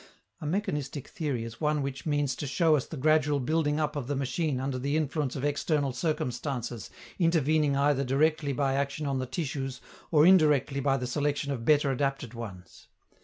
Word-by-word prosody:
A 150 - -5
mechanistic 150 - -2
theory 140 -8 -3
is 115 +3 -9
one 150 -1 +1
which 135 +2 -5
means 145 -3 +1
to 145 - -4
show 160 +3 +3
us 140 - -1
the 160 - -7
gradual 150 0 +3
building 150 +2 0
up 150 -1 -1
of 140 -4 -3
the 145 - -1
machine 135 +1 -1
under 130 0 -2
the 140 +4 0
influence 150 -3 -1
of 135 - -4
external 145 -1 0
circumstances 125 -5 -3 0.3
intervening 155 -4 +2
either 140 0 +2
directly 145 +2 +1
by 135 0 0
action 140 +2 -1
on 135 -2 -1
the 130 - -3
tissues 135 -4 -3 0.3
or 155 -2 +5
indirectly 150 -6 +4
by 135 0 +2
the 125 - -3
selection 145 +2 -1
of 120 -4 -4
better 145 -1 +4
adapted 135 -2 -2
ones. 100 -7 -9
140 Hz, 180 wpm, -28 LUFS, 135-150 Hz, 0.3 s, or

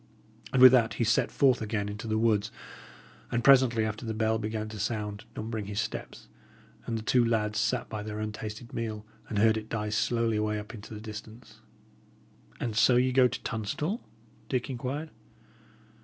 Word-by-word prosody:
And 130 -1 +4
with 130 - +12
that 120 -3 +3
he - - 0
set 115 +2 +2
forth 130 -4 +3
again 105 -1 -2
into 105 +2 -6
the 110 0 0
woods; 110 -2 +2 0.8
and 120 0 0
presently 125 -4 +5
after 110 +2 -4
the 110 -2 -3
bell 110 0 +1
began 110 0 -3
to 110 -1 -8
sound, 105 -1 -3
numbering 110 -1 -4
his 105 0 -3
steps, - - -5 0.6
and 115 - -1
the 110 - -5
two 125 +2 +3
lads 110 -2 0
sat 120 +2 0
by 105 - -5
their 105 0 -5
untasted 110 +2 -6
meal, 110 -2 -4 0.2
and 105 - -3
heard 110 +1 +4
it 110 0 -6
die 105 -1 -2
slowly 115 +1 +1
away 105 0 0
up 105 +1 -7
hill 115 - -9
into 105 +2 -10
the 105 - -8
distance. 110 +2 -10 1.0
"And 115 -3 -3
so 120 +2 +5
ye 125 +1 +3
go 130 0 +5
to 125 - -6
Tunstall?" 145 - -2 0.5
Dick 130 0 -1
inquired. 135 +5 -4
110 Hz, 185 wpm, -29 LUFS, 105-120 Hz, 1.0 s, with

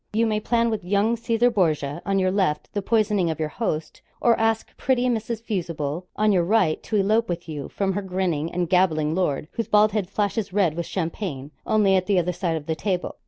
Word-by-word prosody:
You 225 +2 +2
may 215 -1 0
plan 235 +1 +1
with 215 -3 -3
young 200 +5 +2
Caesar 230 +1 +1
Borgia, 155 -6 0
on 195 0 +1
your 185 -1 +2
left, 185 -6 -1
the 205 - -1
poisoning 210 -4 +1
of 160 -1 -3
your 155 -1 -1
host; 155 -7 -3 0.2
or 235 -1 +4
ask 225 0 0
pretty 255 -2 +1
Mrs. 230 -2 -2
Fusible, 170 -5 -3
on 215 0 +3
your 180 -3 +3
right, 185 -4 +2
to 220 - -4
elope 215 +2 +2
with 170 0 -4
you 150 -4 -6
from 195 -1 -1
her 205 - -2
grinning 180 -5 -2
and 180 0 -1
gabbling 160 -4 +2
lord, 155 -5 -1
whose 230 - -3
bald 210 0 +4
head 200 -3 -2
flashes 205 0 -1
red 185 -5 +2
with 170 +1 -4
champagne 160 -5 -4 0.2
only 205 -3 +3
at 185 -1 +1
the 200 -2 +2
other 180 0 +1
side 170 -2 -1
of 150 - -8
the 160 - -1
table. 180 +3 -3
190 Hz, 215 wpm, -24 LUFS, 165-215 Hz, 0.2 s, or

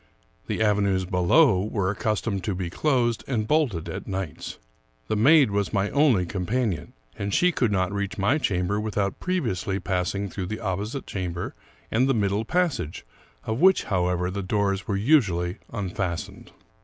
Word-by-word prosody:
The - - 0
avenues 100 -3 +2
below 90 - +4
were 100 -3 -1
accustomed 105 -2 -1
to 100 - -1
be 90 -2 -4
closed 125 -5 +1
and 110 -5 -1
bolted 125 - +1
at - - -6
nights. 95 -4 -5 0.5
The - - 0
maid 135 +2 +5
was 100 +1 -1
my 100 0 +1
only 140 -11 +3
companion; 100 0 -2 0.3
and 100 0 -2
she 180 - +3
could 120 -9 +1
not 95 -2 +1
reach 100 0 -3
my 105 +10 +2
chamber 100 -4 0
without 105 -2 -2
previously 110 - -1
passing 95 +2 -1
through 95 -1 -5
the 110 +3 -4
opposite 105 +6 -3
chamber 90 -2 -4 0.4
and 125 +4 +2
the 135 - +3
middle 100 0 0
passage, 165 - -1 0.4
of 110 +2 -2
which, 190 +1 +5
how 90 -3 0
ever, 90 0 -1
the 100 +1 -3
doors 100 0 0
were 100 - 0
usually 100 - +2
unfastened. 95 -4 -4
100 Hz, 160 wpm, -25 LUFS, 95-115 Hz, 0.5 s, maid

